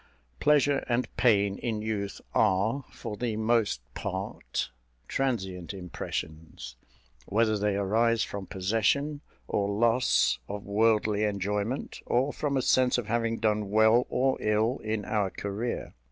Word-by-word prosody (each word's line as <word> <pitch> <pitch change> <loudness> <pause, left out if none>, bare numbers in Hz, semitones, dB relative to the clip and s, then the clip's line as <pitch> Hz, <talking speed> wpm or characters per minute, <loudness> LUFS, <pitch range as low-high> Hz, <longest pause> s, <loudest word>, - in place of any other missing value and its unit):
Pleasure 145 -2 +3
and 120 +1 -1
pain, 100 -5 +3
in 110 -3 -2
youth, 105 -2 -3
are, 110 +5 +2
for 105 - -7
the 115 0 -2
most 110 - +1
part, - - -4 0.4
transient 95 -9 -2
impressions, 80 -7 -6 0.5
whether 110 +1 +2
they 105 -1 0
arise 110 +3 +2
from 100 -2 -6
possession 115 +10 0 0.3
or 100 0 0
loss 115 +4 +3
of 100 0 -6
worldly 105 0 +2
enjoyment, 105 +4 -2
or 130 +4 +1
from 140 -2 -1
a 130 - 0
sense 130 -1 +3
of 120 - -2
having 115 +1 0
done 105 -2 0
well 110 +3 +4
or 130 +1 +1
ill 110 +4 +1
in 110 -1 -3
our 105 -4 0
career. 100 +5 -4
110 Hz, 130 wpm, -28 LUFS, 100-120 Hz, 0.5 s, well